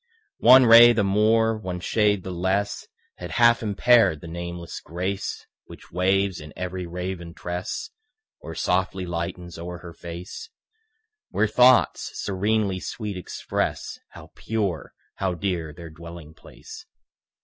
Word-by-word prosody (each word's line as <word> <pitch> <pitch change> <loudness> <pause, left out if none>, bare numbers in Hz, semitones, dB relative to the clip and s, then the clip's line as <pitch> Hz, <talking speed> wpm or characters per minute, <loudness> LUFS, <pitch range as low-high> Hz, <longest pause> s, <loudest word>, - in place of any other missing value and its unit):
One 130 +2 +8
ray 120 +1 +9
the 110 -3 +1
more, 110 +3 +3
one 90 -3 -5
shade 105 0 +1
the 95 - -6
less 95 +3 -1 0.3
Had - - -7
half 120 -1 +4
impaired 110 -5 +3
the 85 - -10
nameless 85 0 -6
grace 90 +4 -4 0.2
Which - - -14
waves 95 +1 +1
in 75 0 -10
every 90 0 -5
raven 90 -1 -6
tress 90 - -5 0.5
Or - - -9
softly 95 0 -1
lightens 85 0 -5
o'er 90 +1 -6
her 85 -1 -11
face, 85 - -9 0.8
Where 105 - +1
thoughts 125 +3 +4
serenely 100 0 0
sweet 105 +1 -5
express 90 - -4
How - - -14
pure, 100 -7 -3 0.2
how 95 -2 -1
dear 85 -3 -3
their 85 +1 -11
dwelling 85 -1 -11
place. - - -13
95 Hz, 130 wpm, -24 LUFS, 85-105 Hz, 0.8 s, ray